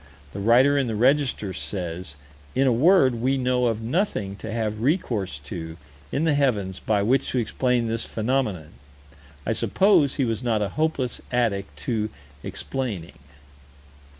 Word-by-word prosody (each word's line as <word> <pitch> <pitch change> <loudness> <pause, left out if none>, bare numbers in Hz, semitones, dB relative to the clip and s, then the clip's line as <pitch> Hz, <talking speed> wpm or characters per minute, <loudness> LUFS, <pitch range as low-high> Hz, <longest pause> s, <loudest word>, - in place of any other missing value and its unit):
The 100 - -5
writer 125 +7 +5
in 135 - 0
the 110 - -2
Register 125 -4 +2
says: 90 -6 -5 0.4
"In 135 - +3
a 130 - +4
word, 130 -3 +4
we 135 +2 +2
know 125 -1 +1
of 115 -1 -1
nothing 115 - -1
to - - -7
have 110 -1 -2
recourse 115 - 0
to, 80 +1 -6 0.3
in 145 - 0
the 160 -2 +3
heavens, 105 -10 0
by 105 -2 +1
which 130 +6 +2
to - - -1
explain 125 +1 +1
this 115 0 -1
phenomenon." 110 - -1 0.8
I - - +1
suppose 190 -9 +3
he 135 - +1
was 115 -1 -2
not 115 -4 +1
a 100 - -2
hopeless 145 - -1
addict 100 - 0
to 110 +1 -1 0.3
explaining. 110 - -5
115 Hz, 150 wpm, -24 LUFS, 100-135 Hz, 0.8 s, writer